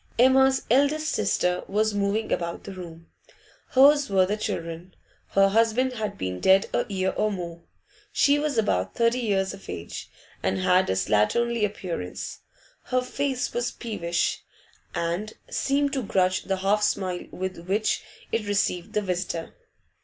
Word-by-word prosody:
Emma's 265 Hz, +2 st, +5 dB
eldest 290 Hz, +4 st, +3 dB
sister 180 Hz, -3 st, +1 dB
was 215 Hz, +2 st, +1 dB
moving 205 Hz, +2 st, 0 dB
about 170 Hz, -1 st, -2 dB
the 200 Hz, -, -7 dB
room. 165 Hz, -3 st, -9 dB, 0.6 s
Hers 280 Hz, +1 st, +5 dB
were 190 Hz, -2 st, +4 dB
the 205 Hz, +3 st, -1 dB
children; 170 Hz, -3 st, -5 dB, 0.4 s
her 195 Hz, 0 st, +5 dB
husband 230 Hz, +4 st, +2 dB
had 220 Hz, -3 st, -4 dB
been 90 Hz, -1 st, -3 dB
dead 190 Hz, -, +5 dB
a -, -, 0 dB
year 190 Hz, -1 st, 0 dB
or 215 Hz, -, 0 dB
more. 170 Hz, -3 st, -6 dB, 0.5 s
She 285 Hz, +1 st, +4 dB
was 295 Hz, -3 st, -1 dB
about 95 Hz, -, +1 dB
thirty 235 Hz, +2 st, +2 dB
years 195 Hz, -5 st, 0 dB
of 195 Hz, -, -12 dB
age, 85 Hz, +1 st, -6 dB, 0.3 s
and 95 Hz, +2 st, 0 dB
had 180 Hz, -, +3 dB
a -, -, +2 dB
slatternly 110 Hz, -, +1 dB
appearance; 180 Hz, -, -4 dB, 0.5 s
her 255 Hz, 0 st, 0 dB
face 265 Hz, 0 st, -2 dB
was 240 Hz, 0 st, 0 dB
peevish, 175 Hz, -7 st, -2 dB, 0.5 s
and 175 Hz, +6 st, -2 dB, 0.2 s
seemed 280 Hz, 0 st, +1 dB
to 270 Hz, -, 0 dB
grudge 185 Hz, -4 st, +1 dB
the 195 Hz, -1 st, 0 dB
half 200 Hz, +3 st, +2 dB
smile 185 Hz, -3 st, -1 dB
with 185 Hz, -2 st, -5 dB
which 210 Hz, +3 st, +1 dB, 0.3 s
it 225 Hz, -2 st, -1 dB
received 195 Hz, -3 st, 0 dB
the 210 Hz, -, +1 dB
visitor. 180 Hz, -3 st, -3 dB
200 Hz, 150 wpm, -26 LUFS, 180-235 Hz, 0.6 s, Emma's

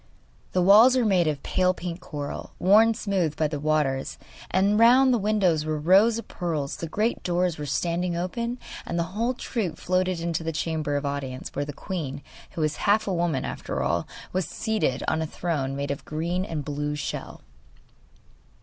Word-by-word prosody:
The 180 Hz, -, +2 dB
walls 220 Hz, +7 st, +7 dB
were 245 Hz, -, +2 dB
made 185 Hz, -5 st, +3 dB
of 150 Hz, -3 st, -2 dB
pale 185 Hz, 0 st, +1 dB
pink 175 Hz, 0 st, -5 dB
coral, 145 Hz, -4 st, -6 dB
worn 220 Hz, +5 st, +5 dB
smooth 185 Hz, -8 st, -1 dB
by 155 Hz, -, +1 dB
the 150 Hz, -1 st, -4 dB
waters, 145 Hz, -3 st, 0 dB, 0.3 s
and 200 Hz, +3 st, +2 dB
round 255 Hz, +3 st, +6 dB
the 240 Hz, -, +2 dB
windows 195 Hz, -7 st, +2 dB
were 155 Hz, 0 st, -2 dB
rows 195 Hz, +8 st, +5 dB
of 230 Hz, -, -7 dB
pearls; 155 Hz, -6 st, -3 dB
the 165 Hz, -, -4 dB
great 215 Hz, +8 st, -1 dB
doors 175 Hz, -2 st, 0 dB
were 150 Hz, -, -4 dB
standing 170 Hz, +5 st, -1 dB
open, 235 Hz, +7 st, -3 dB, 0.3 s
and 170 Hz, -, -4 dB
the 170 Hz, -, +2 dB
whole 235 Hz, +4 st, 0 dB
troop 195 Hz, -11 st, -3 dB
floated 185 Hz, -1 st, 0 dB
into 165 Hz, -1 st, -2 dB
the 165 Hz, -, -2 dB
chamber 155 Hz, -2 st, -2 dB
of 145 Hz, 0 st, -1 dB
audience, 140 Hz, -2 st, -4 dB
where 145 Hz, -, -2 dB
the 145 Hz, -, -5 dB
queen, 145 Hz, -4 st, -5 dB, 0.3 s
who 165 Hz, -, -3 dB
was 155 Hz, -1 st, 0 dB
half 215 Hz, +1 st, +2 dB
a 195 Hz, -, 0 dB
woman 170 Hz, -5 st, 0 dB
after 65 Hz, -, -3 dB
all, 85 Hz, +6 st, 0 dB, 0.3 s
was 185 Hz, -4 st, 0 dB
seated 215 Hz, -, -1 dB
on 160 Hz, -, +1 dB
a 160 Hz, -, -2 dB
throne 145 Hz, -6 st, -2 dB
made 140 Hz, 0 st, -2 dB
of 140 Hz, -, -3 dB
a -, -, -22 dB
green 170 Hz, +4 st, -2 dB
and 155 Hz, -7 st, -4 dB
blue 150 Hz, 0 st, -2 dB
shell. 150 Hz, -, -5 dB
170 Hz, 190 wpm, -26 LUFS, 150-195 Hz, 0.3 s, walls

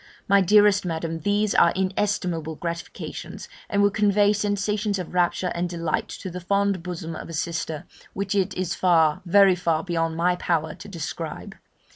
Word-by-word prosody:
Ah! -, -, -24 dB
my 200 Hz, 0 st, +6 dB
dearest 205 Hz, +1 st, +5 dB
Madam, 165 Hz, -1 st, -3 dB
these 205 Hz, +2 st, +1 dB
are -, -, +5 dB
inestimable 185 Hz, -4 st, -1 dB
gratifications, 170 Hz, +1 st, -6 dB, 0.2 s
and 200 Hz, 0 st, +2 dB
would 205 Hz, -1 st, +3 dB
convey 205 Hz, -1 st, +3 dB
sensations 205 Hz, 0 st, -1 dB
of 180 Hz, -2 st, -6 dB
rapture 180 Hz, 0 st, +1 dB
and 175 Hz, +1 st, -2 dB
delight 170 Hz, -2 st, -2 dB
to 190 Hz, -, -7 dB
the 180 Hz, +1 st, -6 dB
fond 200 Hz, 0 st, +1 dB
bosom 165 Hz, -2 st, -6 dB
of -, -, -8 dB
a -, -, -7 dB
sister, 160 Hz, -1 st, -3 dB, 0.3 s
which 195 Hz, 0 st, -2 dB
it 195 Hz, -1 st, 0 dB
is 185 Hz, -2 st, -2 dB
far, 160 Hz, -4 st, +3 dB
very 195 Hz, +1 st, +6 dB
far 165 Hz, -3 st, 0 dB
beyond 165 Hz, -2 st, -1 dB
my 175 Hz, +1 st, +2 dB
power 160 Hz, -3 st, -1 dB
to -, -, -12 dB
describe. 170 Hz, -6 st, -6 dB
180 Hz, 170 wpm, -24 LUFS, 165-200 Hz, 0.3 s, my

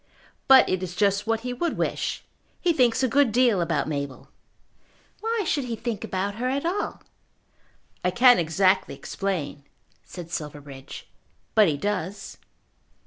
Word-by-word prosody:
"But 265 Hz, -1 st, +8 dB
it 185 Hz, -, -1 dB
is 180 Hz, -1 st, -5 dB
just 200 Hz, +1 st, +1 dB
what 225 Hz, 0 st, 0 dB
he 250 Hz, +1 st, -4 dB
would 335 Hz, +7 st, -2 dB
wish. -, -, -2 dB, 0.4 s
He 350 Hz, -2 st, +2 dB
thinks 250 Hz, -3 st, +2 dB
a -, -, +4 dB
good 275 Hz, -1 st, +3 dB
deal 235 Hz, -5 st, +3 dB
about 165 Hz, -4 st, 0 dB
Mabel." 140 Hz, -3 st, -5 dB, 0.9 s
"Why 450 Hz, 0 st, -1 dB
should 285 Hz, -4 st, 0 dB
he 235 Hz, -2 st, -3 dB
think 225 Hz, -2 st, -4 dB
about 200 Hz, +2 st, -3 dB
her 255 Hz, -, 0 dB
at 280 Hz, +4 st, -2 dB
all?" 370 Hz, +5 st, -2 dB, 1.0 s
"I 180 Hz, -, +2 dB
can't 245 Hz, +5 st, +6 dB
exactly 185 Hz, +3 st, +2 dB
explain," 175 Hz, -7 st, -4 dB, 0.4 s
said 175 Hz, -2 st, -10 dB
Silverbridge, 145 Hz, -4 st, -7 dB, 0.5 s
"but 215 Hz, -3 st, +6 dB
he 150 Hz, -3 st, 0 dB
does." 200 Hz, +2 st, -4 dB
200 Hz, 145 wpm, -25 LUFS, 170-250 Hz, 1.0 s, But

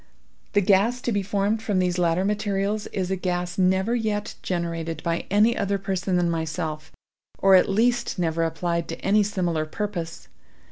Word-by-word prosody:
The 205 Hz, -, +4 dB
gas 205 Hz, +5 st, +3 dB
to 240 Hz, -, -1 dB
be 205 Hz, -2 st, +1 dB
formed 200 Hz, +2 st, 0 dB
from 210 Hz, -3 st, -1 dB
these 180 Hz, -1 st, +1 dB
latter 175 Hz, +2 st, +2 dB
materials 205 Hz, 0 st, -1 dB
is 190 Hz, -2 st, -3 dB
a -, -, +2 dB
gas 180 Hz, -1 st, -2 dB
never 190 Hz, +4 st, +2 dB
yet 215 Hz, -3 st, -2 dB
generated 165 Hz, -3 st, -3 dB
by 170 Hz, 0 st, -2 dB
any 215 Hz, +4 st, +4 dB
other 200 Hz, -1 st, 0 dB
person 190 Hz, -1 st, -2 dB
than 175 Hz, -1 st, +2 dB
myself—or 160 Hz, +3 st, -2 dB
at 185 Hz, -, +6 dB
least 235 Hz, +4 st, +1 dB
never 165 Hz, -2 st, 0 dB
applied 170 Hz, +1 st, -1 dB
to 165 Hz, -, -6 dB
any 210 Hz, +2 st, +4 dB
similar 175 Hz, -6 st, -1 dB
purpose. 175 Hz, -3 st, -5 dB
190 Hz, 160 wpm, -24 LUFS, 170-205 Hz, -, at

